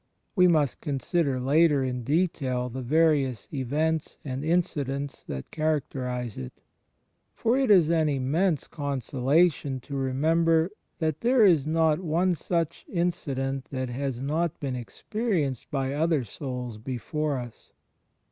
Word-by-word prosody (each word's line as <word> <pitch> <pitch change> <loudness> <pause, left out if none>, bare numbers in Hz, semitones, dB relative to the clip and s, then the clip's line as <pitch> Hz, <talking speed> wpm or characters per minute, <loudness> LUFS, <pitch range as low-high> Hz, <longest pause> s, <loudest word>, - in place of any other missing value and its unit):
We 180 -2 +6
must 150 -6 +2
consider 140 -1 0
later 145 +2 +3
in 125 -1 -2
detail 135 -4 0
the 130 +2 -5
various 140 -4 +2
events 150 +4 -1
and 135 0 -4
incidents 145 -4 -1
that 65 -1 -6
characterize 130 -7 -2
it. 65 -1 -6 0.8
For 230 +2 +1
it 265 -2 +2
is 175 -6 +6
an 160 -2 +3
inmaense 150 +5 +1
consolation 140 +1 +1
to 140 +3 -7
remember 160 +6 +2 0.3
that 155 -3 -1
there 240 -1 +5
is 160 -7 +4
not 160 0 +2
one 175 +1 +1
such 165 0 -2
incident 135 -7 -1
that 130 -2 -4
has 130 0 -3
not 160 +3 -1
been 135 -3 -3
experienced 150 - -2
by 135 -1 -1
other 155 -1 +1
souls 125 -1 -6
before 135 +5 -2
us. 120 -2 -9
145 Hz, 130 wpm, -27 LUFS, 130-165 Hz, 0.8 s, We